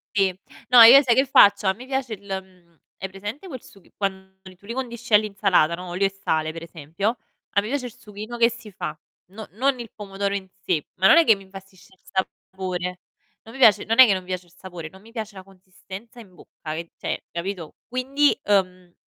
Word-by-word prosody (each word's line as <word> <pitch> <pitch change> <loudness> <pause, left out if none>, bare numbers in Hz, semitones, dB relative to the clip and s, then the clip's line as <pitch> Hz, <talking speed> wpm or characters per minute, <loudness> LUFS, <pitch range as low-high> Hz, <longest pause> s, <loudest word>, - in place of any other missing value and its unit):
Sì, 190 -2 +1 0.3
no 245 -1 +9
io 240 +5 +10
sai 255 -4 +2
che 265 - +4
faccio, 205 -6 +5
a 190 - +4
me 240 +7 -12
piace 265 -3 -3
il 205 - -6
mhmm, 185 -3 -8 0.2
hai 190 - -5
presente 205 - -8
quel 260 -7 -8
sughi 195 -3 -19
quando 190 -1 -4 0.2
tu 200 - -19
li 230 - -5
condisci 240 -3 -4
all'insalata, 200 -6 +3
no, 180 +1 -7
olio 180 +3 -1
e - - -1
sale 160 -5 -2
per 165 0 -8
esempio, 170 +7 -3 0.4
ma 200 - +3
mi 210 - -6
piace 265 0 -2
il 235 - -10
sughino 215 +1 -8
che 235 0 +4
si 230 -2 -11
fa. 175 -5 -6 0.3
No 215 +3 -10
non 260 +5 0
il 235 -3 -8
pomodoro 200 -1 -3
in 195 -1 -4 0.2
sé, 160 -5 0
ma 185 - +3
non 195 - +8
è 335 - +7
che 225 - +6
mi 195 -1 -13
infastidisce 195 -1 -15
il 185 - -36
sapore. 185 -1 -4 0.5
Non 225 - -13
mi 270 - -9
piace 220 -6 +6
non 225 +1 0
è 260 - +11
che 210 - +3
non 185 -1 -2
piace 185 0 -5
il 170 - -25
sapore, 175 -4 -9
non 190 - -16
mi 225 +3 -18
piace 220 -3 -6
la 190 - -10
consistenza 195 +4 -13
in 195 -5 -16
bocca 155 -2 -9
che 165 +1 -6
cioè, - - -4
capito, 170 -1 -5
quindi, 270 +4 +1
uhm 185 -3 0
195 Hz, 220 wpm, -23 LUFS, 185-230 Hz, 0.5 s, è